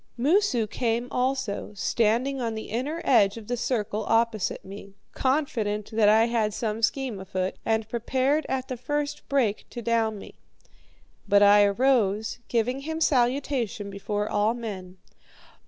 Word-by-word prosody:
Moosu 290 Hz, -, +2 dB
came 230 Hz, +2 st, -1 dB
also, 255 Hz, -5 st, -2 dB
standing 235 Hz, +7 st, +1 dB
on 230 Hz, -2 st, -2 dB
the 220 Hz, -, -6 dB
inner 285 Hz, +9 st, -3 dB
edge 210 Hz, -5 st, +4 dB
of 225 Hz, -, -9 dB
the 245 Hz, -, -2 dB
circle 220 Hz, -3 st, -2 dB
opposite 225 Hz, -3 st, 0 dB
me, 195 Hz, 0 st, -10 dB, 0.2 s
confident 230 Hz, -7 st, -1 dB
that 215 Hz, -2 st, +4 dB
I 220 Hz, +2 st, +5 dB
had 225 Hz, -3 st, 0 dB
some 220 Hz, -1 st, -2 dB
scheme 250 Hz, -2 st, -1 dB
afoot, 190 Hz, -1 st, -3 dB
and 220 Hz, -1 st, +1 dB
prepared 260 Hz, +6 st, 0 dB
at 265 Hz, 0 st, -2 dB
the 255 Hz, -, -5 dB
first 290 Hz, +4 st, -3 dB
break 245 Hz, -7 st, 0 dB
to 240 Hz, -, -7 dB
down 225 Hz, -2 st, +1 dB
me. -, -, -11 dB, 0.9 s
But 205 Hz, 0 st, +5 dB
I 205 Hz, 0 st, +7 dB
arose, 220 Hz, -1 st, +1 dB
giving 245 Hz, +3 st, 0 dB
him 320 Hz, +3 st, -4 dB
salutation 245 Hz, -6 st, 0 dB
before 205 Hz, +1 st, -3 dB
all 210 Hz, +3 st, +1 dB
men. 190 Hz, -6 st, -7 dB
230 Hz, 145 wpm, -26 LUFS, 210-260 Hz, 0.9 s, I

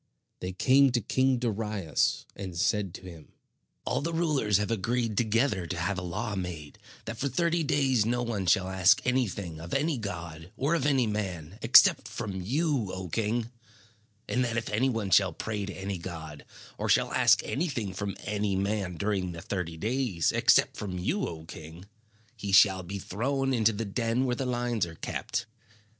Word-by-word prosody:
They 90 Hz, -, -4 dB
came 135 Hz, +8 st, +4 dB
to 120 Hz, -, +3 dB
King 130 Hz, +2 st, +2 dB
Darius, 105 Hz, -8 st, -1 dB
and 95 Hz, -4 st, -6 dB
said 100 Hz, +1 st, +1 dB
to -, -, -9 dB
him: 85 Hz, -4 st, -12 dB, 0.5 s
"All -, -, 0 dB
the 165 Hz, +3 st, -2 dB
rulers 150 Hz, -, +2 dB
have 105 Hz, +2 st, -1 dB
agreed 115 Hz, +1 st, -1 dB
together 110 Hz, -4 st, +1 dB
to 85 Hz, -, -4 dB
have 95 Hz, +3 st, -1 dB
a -, -, -6 dB
law 105 Hz, +5 st, -3 dB
made 85 Hz, -6 st, -6 dB, 0.3 s
that 115 Hz, 0 st, -6 dB
for 140 Hz, -, 0 dB
thirty 170 Hz, +5 st, +1 dB
days 135 Hz, -6 st, +2 dB
no 120 Hz, +2 st, 0 dB
one 105 Hz, -6 st, -2 dB
shall 95 Hz, +2 st, +3 dB
ask 95 Hz, 0 st, +4 dB
anything 100 Hz, -10 st, -1 dB
of 85 Hz, +1 st, -5 dB
any 145 Hz, -1 st, +1 dB
god 85 Hz, -4 st, -6 dB
or 140 Hz, +5 st, +1 dB
of 145 Hz, -4 st, +1 dB
any 135 Hz, -4 st, +3 dB
man, 95 Hz, -4 st, -4 dB
except -, -, +6 dB
from 95 Hz, -3 st, -5 dB
you, 135 Hz, -, 0 dB
O 95 Hz, -1 st, -6 dB
king; 115 Hz, +5 st, -1 dB, 0.8 s
and 125 Hz, -, +1 dB
that 115 Hz, -1 st, -1 dB
if 115 Hz, -, -2 dB
any 120 Hz, +6 st, +2 dB
one 110 Hz, -6 st, -2 dB
shall 95 Hz, -1 st, +5 dB
pray 105 Hz, +2 st, -4 dB
to 100 Hz, -, -5 dB
any 95 Hz, -1 st, -4 dB
god, 80 Hz, -4 st, -8 dB, 0.3 s
or -, -, -2 dB
shall -, -, +3 dB
ask -, -, +4 dB
anything 135 Hz, -, -2 dB
from 100 Hz, 0 st, -4 dB
any 105 Hz, -2 st, -1 dB
man 100 Hz, -2 st, -1 dB
during 95 Hz, -3 st, -1 dB
the 85 Hz, -, -8 dB
thirty 90 Hz, -4 st, -4 dB
days, 110 Hz, -, 0 dB
except -, -, +3 dB
from 95 Hz, -3 st, -4 dB
you, 190 Hz, -, -1 dB
O 80 Hz, -1 st, -8 dB
king, 80 Hz, +2 st, -10 dB, 0.5 s
he 105 Hz, -3 st, -5 dB
shall 95 Hz, -1 st, +6 dB
be 95 Hz, +3 st, -6 dB
thrown 135 Hz, +8 st, -1 dB
into 115 Hz, -2 st, +3 dB
the 110 Hz, +1 st, -4 dB
den 115 Hz, +4 st, 0 dB
where 125 Hz, -1 st, 0 dB
the 130 Hz, +1 st, -3 dB
lions 120 Hz, -5 st, 0 dB
are 80 Hz, -, -10 dB
kept. -, -, -3 dB
105 Hz, 180 wpm, -28 LUFS, 90-120 Hz, 0.8 s, except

